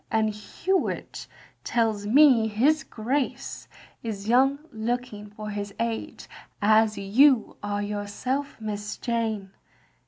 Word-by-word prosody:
And 220 -1 +1
Hewitt 350 - -2 0.4
tells 220 -3 0
me 255 -2 +6
his 270 +9 +2
Grace 255 +5 -3 0.3
is 210 -3 -5
young 265 +4 +4
looking 225 -1 -3
for 210 0 -7
his 205 0 -5
age, 230 -1 -3 0.3
as 215 0 +4
you 230 +6 +4
are 205 0 -2
yourself. 210 +8 -3
Miss 210 -1 -5
Jane. 220 -5 -2
220 Hz, 105 wpm, -26 LUFS, 205-245 Hz, 0.4 s, me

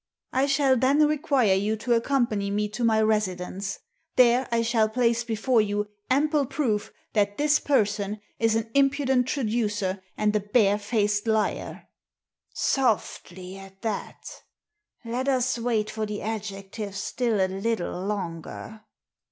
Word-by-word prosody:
I 265 +2 +2
shall 275 -2 +3
then 275 +5 +4
require 285 -8 +2
you 205 +3 +1
to 240 +3 0
accompany 230 -4 +1
me 210 +1 0
to 215 +3 -4
my 220 -1 +3
residence. 195 -2 -1 0.4
There 250 0 +4
I 230 0 +2
shall 225 -2 +2
place 235 0 +1
before 230 +1 +1
you 205 0 -2 0.2
ample 290 +1 +2
proof 245 -7 -1 0.2
that 205 -1 +1
this 295 0 +3
person 210 -6 0 0.2
is 225 -1 +2
an 225 0 -2
impudent 270 -2 +2
traducer, 210 -7 -1 0.2
and 210 0 +1
a - - +4
barefaced 205 0 +1
liar." 220 -1 -1 0.6
Softly 190 -7 -1
at 195 +1 -14
that 220 -3 -4 0.8
Let 245 +3 -2
us 255 -2 +1
wait 225 -3 0
for 220 -1 -3
the 210 0 -5
adjectives 200 -1 -5
still 225 +1 -1
a 190 - +4
little 190 -1 -2
longer. 195 +2 -5
220 Hz, 135 wpm, -26 LUFS, 205-250 Hz, 0.8 s, then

